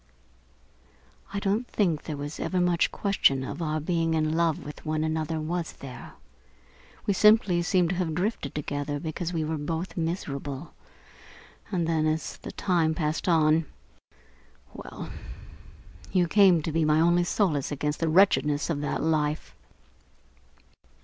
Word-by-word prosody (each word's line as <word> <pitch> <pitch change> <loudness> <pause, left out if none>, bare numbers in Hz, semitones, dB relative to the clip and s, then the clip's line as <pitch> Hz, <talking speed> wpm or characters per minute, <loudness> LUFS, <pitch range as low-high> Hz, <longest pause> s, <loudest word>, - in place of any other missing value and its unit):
"I 200 - -2
don't 205 +5 0
think 170 -8 0
there 150 -3 -4
was 145 +2 -6
ever 185 - -1
much 175 -1 +2
question 140 -10 +2
of 165 - -6
our 155 -1 -1
being 165 0 0
in 155 0 +1
love 165 -2 +1
with 150 - -9
one 155 0 -1
another, 160 0 -1
was 165 +2 -3
there? 135 -2 -10 0.9
We 200 - +2
simply 200 -3 +5
seemed 175 -1 +2
to 185 - -1
have 165 -4 -1
drifted 180 - -2
together 145 0 -3
because 165 +2 -4
we 165 -3 -1
were 155 0 -2
both 165 +4 -4
miserable, 150 -4 -4 1.0
and 175 -4 0
then, 160 -1 +1
as 155 +1 -2
the - - -8
time 165 -4 +1
passed 155 +2 -1
on 160 -1 +3 1.1
well, - - -8 1.0
you 180 -2 +3
came 185 -4 +5
to 160 - -2
be 165 +1 +1
my 155 0 +3
only 175 +2 +4
solace 170 -7 0
against 150 +1 -2
the 165 - +1
wretchedness 155 -4 +3
of 145 -3 -2
that 145 - -2
life." 155 -1 0
160 Hz, 145 wpm, -27 LUFS, 150-175 Hz, 1.1 s, simply